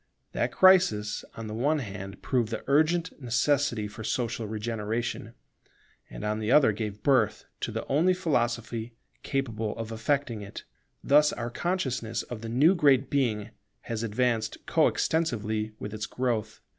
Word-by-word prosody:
That - - -1
crisis 180 - +4
on 115 - -6
the 105 - -6
one 145 +8 +1
hand 100 -6 -7
proved 120 -5 +1
the 115 - -4
urgent 160 +4 +1
necessity 125 -2 +1
for 110 +2 -9
social 115 -1 -2
regeneration, 110 +2 -3 0.7
and - - -8
on 105 +1 -1
the 110 +2 -1
other 140 -6 +6
gave 105 -1 -5
birth 115 -6 +2
to - - -3
the 110 +1 -4
only 170 +7 +3
philosophy 120 - -1 0.3
capable 115 -6 -2
of 115 0 -5
effecting 115 0 -1
it. 100 -1 -8 0.4
Thus 150 +1 +5
our 120 0 -4
consciousness 125 -9 -2
of 120 -3 -8
the 115 - -6
new 145 +10 +5
Great 140 -6 +3
Being 115 -7 0 0.3
has 115 -2 -4
advanced 115 0 -1
co - - +3
extensively 110 -9 -1
with 105 0 -6
its 110 -1 -4
growth. 110 -4 -2
115 Hz, 150 wpm, -28 LUFS, 110-140 Hz, 0.7 s, other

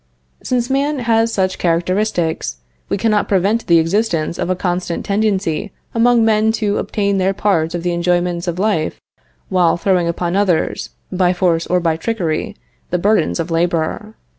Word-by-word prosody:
Since 250 0 -1
man 280 +2 +1
has 230 -2 +1
such 190 -3 -1
characteristics, 170 - 0 0.3
we - - 0
cannot 210 0 +1
prevent 200 +4 +1
the 170 - +5
existence 170 -1 0
of - - -1
a 185 - +1
constant 180 -1 -2
tendency 200 -5 0 0.2
among 235 0 +4
men 220 0 +3
to 210 -2 0
obtain 200 -2 -1
their 190 +1 +1
part 170 -5 +1
of 170 - -4
the 175 -1 0
enjoyments 175 0 0
of 175 0 -2
life 190 -6 0 0.5
while 175 -3 +3
throwing 180 -1 +1
upon 170 +1 -2
others, 195 -5 0 0.2
by 180 -1 +2
force 175 -2 +1
or 180 - +2
by 165 -2 0
trickery, 170 -4 -2 0.3
the 180 - 0
burdens 205 +1 +1
of 165 +1 -3
labor. 170 +5 -1
185 Hz, 160 wpm, -18 LUFS, 170-215 Hz, 0.5 s, the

